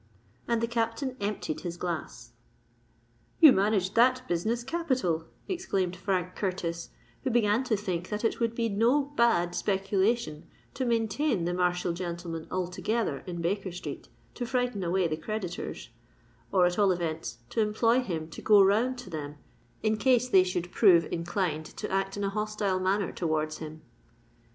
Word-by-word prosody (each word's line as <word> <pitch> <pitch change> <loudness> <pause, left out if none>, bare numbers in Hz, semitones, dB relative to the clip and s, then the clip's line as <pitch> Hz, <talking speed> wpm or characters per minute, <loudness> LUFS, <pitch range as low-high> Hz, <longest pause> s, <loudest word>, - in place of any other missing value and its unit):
And 235 -1 +1
the 230 - +1
Captain 230 +2 -1
emptied 200 -6 -3
his 175 -1 -5
glass. 175 -2 -5 1.1
"You 315 -4 +10
managed 195 -2 +2
that 255 +2 +4
business 220 +8 -1
capital," 255 - -1 0.2
exclaimed 195 - -1
Frank 185 -1 -2
Curtis, 170 -4 -3 0.3
who 265 - 0
began 230 0 +3
to 225 -5 +1
think 185 -3 -3
that 210 +2 -2
it - - 0
would 230 -1 0
be 230 -1 0
no 230 +7 +3
bad 175 -9 +3
speculation 195 -2 0 0.3
to 260 - -2
maintain 230 - +1
the 175 - 0
martial 180 -1 +1
gentleman 170 -2 -5
altogether 185 -1 -1
in 175 -1 -4
Baker 190 +2 -1
Street 175 - -7 0.3
to 245 - -5
frighten 245 -4 -1
away 180 +1 +1
the 155 -1 -2
creditors,—or, 120 - -4
at 180 +3 0
all 200 -2 +5
events, 165 -8 -3
to 225 - +1
employ 225 +3 +3
him 170 -10 -3
to - - -9
go 210 -2 +6
round 225 +7 +2
to 225 -7 -9
them, 150 -2 -5 0.5
in 215 0 +2
case 250 +2 +3
they 195 -6 +6
should 180 -1 -3
prove 175 -7 +6
inclined 170 -2 -2
to - - -3
act 195 +1 -1
in 205 - -2
a 200 - +1
hostile 210 -2 -1
manner 190 +1 +1
towards 155 -2 -1
him. 155 0 -8
195 Hz, 155 wpm, -29 LUFS, 175-230 Hz, 1.1 s, You